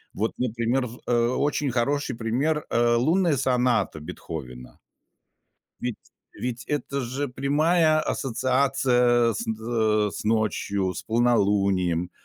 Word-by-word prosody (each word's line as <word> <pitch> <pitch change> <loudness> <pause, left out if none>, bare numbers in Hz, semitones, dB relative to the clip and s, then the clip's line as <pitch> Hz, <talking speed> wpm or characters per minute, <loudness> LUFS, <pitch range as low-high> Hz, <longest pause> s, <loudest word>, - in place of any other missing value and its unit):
Вот, 110 +3 -1
например, 120 +1 0
в 120 +2 -12
э, 120 -1 +2
очень 145 0 0
хороший 130 +2 -1
пример, 135 +7 -1
э, 120 0 +3
"Лунная 160 +5 +2
соната" 125 -9 +1
Бетховена. 65 -5 -8 1.0
Ведь 125 -2 -3 0.4
ведь 125 0 -5
это 140 -1 -2
же 130 +4 -3
прямая 155 +5 +2
ассоциация 125 -3 +1
с, - - -4
э, 110 -1 0
с - - -7
ночью, 105 -3 0
с - - -7
полнолунием. 100 -7 +1
120 Hz, 115 wpm, -25 LUFS, 110-135 Hz, 1.0 s, э